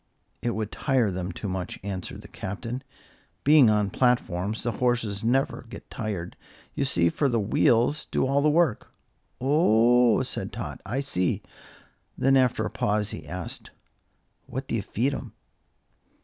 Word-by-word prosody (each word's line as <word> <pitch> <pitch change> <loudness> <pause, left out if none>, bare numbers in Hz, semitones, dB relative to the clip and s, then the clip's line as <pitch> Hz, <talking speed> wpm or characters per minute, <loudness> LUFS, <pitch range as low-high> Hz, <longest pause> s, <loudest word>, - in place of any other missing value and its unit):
"It 120 - -1
would 110 -1 -3
tire 130 -7 +1
them 90 0 -3
too 95 +4 -6
much," 90 -1 -4
answered 95 -2 -5
the - - -11
Captain. 115 +6 -5 0.6
"Being 145 -5 +7
on 105 -2 +2
platforms, 110 -5 0
the 120 - 0
horses 115 -3 0
never 125 +1 0
get - - -11
tired, 100 -7 -4 0.4
you 140 - -1
see, 85 -11 +3
for 140 - +1
the 120 -2 +1
wheels 120 +7 +2
do - - +1
all 140 +2 +2
the 150 - +4
work." 155 -6 +1 0.5
"Oh!" 125 -4 +4
said - - -4
Tot, - - -6
"I 125 +7 -1
see." 95 -10 0 0.7
Then, 135 +1 +3
after 125 -4 +3
a - - -3
pause, 105 0 0
he 80 -2 -8
asked: 90 +2 -5 0.8
"What 130 +1 -5
do - - -4
you 115 - +1
feed 125 +7 -1
'em?" - - -6
115 Hz, 155 wpm, -26 LUFS, 100-130 Hz, 0.8 s, Being